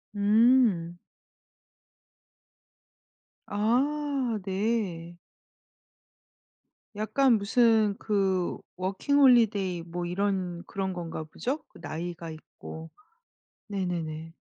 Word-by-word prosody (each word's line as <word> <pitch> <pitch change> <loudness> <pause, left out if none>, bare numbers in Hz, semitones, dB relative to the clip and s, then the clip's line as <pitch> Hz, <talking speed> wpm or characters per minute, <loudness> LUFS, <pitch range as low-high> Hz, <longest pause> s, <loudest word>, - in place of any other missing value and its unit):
음. 205 -5 +3 2.5
아 260 +3 0
네. 190 -4 -2 1.8
약간 225 +3 +3
무슨 220 -1 +3
그 195 -4 0 0.2
워킹 195 +10 0
홀리데이 210 -9 +4
뭐 175 +1 -5
이런 180 -1 -2
그런 190 -1 -3
건가 165 -2 -5
보죠? 255 - -4
그 - - -17
나이가 170 +2 -5
있고. 160 +1 -10 0.8
네네네. 165 -4 -4
195 Hz, 135 characters per minute, -28 LUFS, 175-225 Hz, 2.5 s, 홀리데이